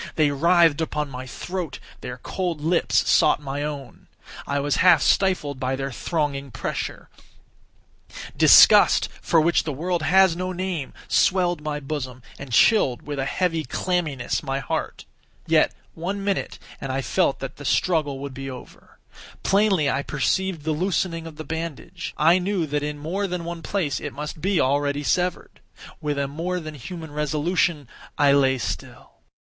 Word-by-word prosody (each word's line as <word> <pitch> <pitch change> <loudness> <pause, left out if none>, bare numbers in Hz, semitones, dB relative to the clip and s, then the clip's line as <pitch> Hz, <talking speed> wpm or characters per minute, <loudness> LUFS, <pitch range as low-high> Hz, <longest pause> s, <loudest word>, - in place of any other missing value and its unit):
They 150 -2 +3
writhed 165 +1 +4
upon 150 -2 -2
my 130 0 -7
throat; 175 +2 -5 0.2
their 125 0 -7
cold 175 +4 -3
lips 165 +3 +1
sought 150 - +4
my 140 0 -4
own; 145 -4 -6 0.4
I 140 0 0
was 145 0 0
half 180 -4 +6
stifled 165 -8 +1
by 130 +1 -1
their 135 +1 -4
thronging 140 -1 -2
pressure; 120 - -5 1.3
disgust, - - +7
for 165 - +3
which 170 +2 +3
the 155 - -3
world 170 +5 -2
has 190 +1 +4
no 185 +1 -3
name, 180 -6 -4
swelled 175 -3 +2
my 150 -1 -3
bosom, 135 -4 -5 0.2
and 140 -2 -8
chilled, 130 - +4
with 145 -1 -5
a 135 - 0
heavy 165 +1 0
clamminess, 165 -7 -2
my 135 -2 -2
heart. 135 - -4 0.4
Yet - - +3 0.2
one 195 +4 -4
minute, 200 -1 -2 0.2
and 135 - -3
I 135 +1 -2
felt 140 +4 +1
that 135 0 -7
the 145 - -9
struggle 150 -3 +1
would 140 0 -6
be 135 +1 -6
over. 125 -2 -12 0.5
Plainly 195 -6 +3
I 140 0 +1
perceived 160 +4 -1
the 160 - -1
loosening 165 0 -1
of 160 - -10
the 155 - -7
bandage. 165 +2 -6
I 165 +4 +5
knew 185 -2 -1
that 145 0 -2
in 150 0 -3
more 180 +7 -2
than 180 -2 -4
one 170 0 -5
place 165 -7 -1
it - - -6
must 150 +1 -6
be 190 0 +1
already 145 +2 +1
severed. 180 +4 -1 0.4
With 150 -1 -2
a 140 0 0
more 170 +6 -3
than 155 -2 -7
human 160 +3 -8
resolution 150 0 0 0.3
I 145 -1 +5
lay 135 -2 +3
still. - - -6
155 Hz, 160 wpm, -23 LUFS, 140-175 Hz, 1.3 s, disgust